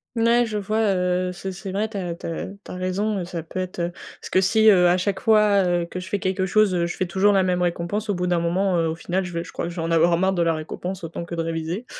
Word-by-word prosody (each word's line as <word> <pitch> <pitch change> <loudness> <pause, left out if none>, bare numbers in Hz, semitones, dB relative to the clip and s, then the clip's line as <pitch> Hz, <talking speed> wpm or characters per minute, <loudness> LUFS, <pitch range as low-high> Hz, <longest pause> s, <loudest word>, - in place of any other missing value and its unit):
N 225 - +1
ouais, 240 +1 +4
je 215 -1 -3
vois, 215 +2 -1 0.2
heu, 180 0 0
c'est 190 +2 -5
c'est 190 +1 -7
vrai, 210 +3 -1
tu 215 - -14
as 175 -3 -3
tu - - -11
as 165 - -4
tu 200 +1 -12
as - - -6
raison. 195 +3 -1
Heu, 180 - -3
ça 170 -2 -5
peut 175 +3 -6
être, 185 0 -4
heu 170 0 -1 0.3
parce - - -10
que 185 - +4
si, 220 +3 +3
heu, 180 -4 +7
à 180 - +3
chaque 190 +1 -1
fois, 210 -2 +4
heu, 175 -1 +1
que 180 +2 -6
je 185 - -8
fais 205 - 0
quelque 190 0 -1
chose. 215 0 +3
Heu, 170 -1 +1
je - - -6
fais 185 - 0
toujours 190 +4 +3
la 195 -2 +3
même 180 -1 0
récompense. 180 +5 -2
Au 205 - +1
bout 180 0 -1
d'un 175 -1 +1
moment, 180 +3 +1
heu, 165 - +1
au 160 - -3
final, 185 +3 -2
je 180 - -6
vais 170 - -2
je - - -11
crois - - -4
que - - -3
je 170 - -9
vais 165 - -3
en 165 - -2
avoir 170 +1 +4
marre 190 +2 +2
de 175 - 0
la 165 -1 +2
récompense. 175 +4 -6
Autant 165 +1 -5
que 170 - -6
de 165 - -1
réviser. 165 +7 -3
185 Hz, 320 wpm, -23 LUFS, 170-200 Hz, 0.3 s, heu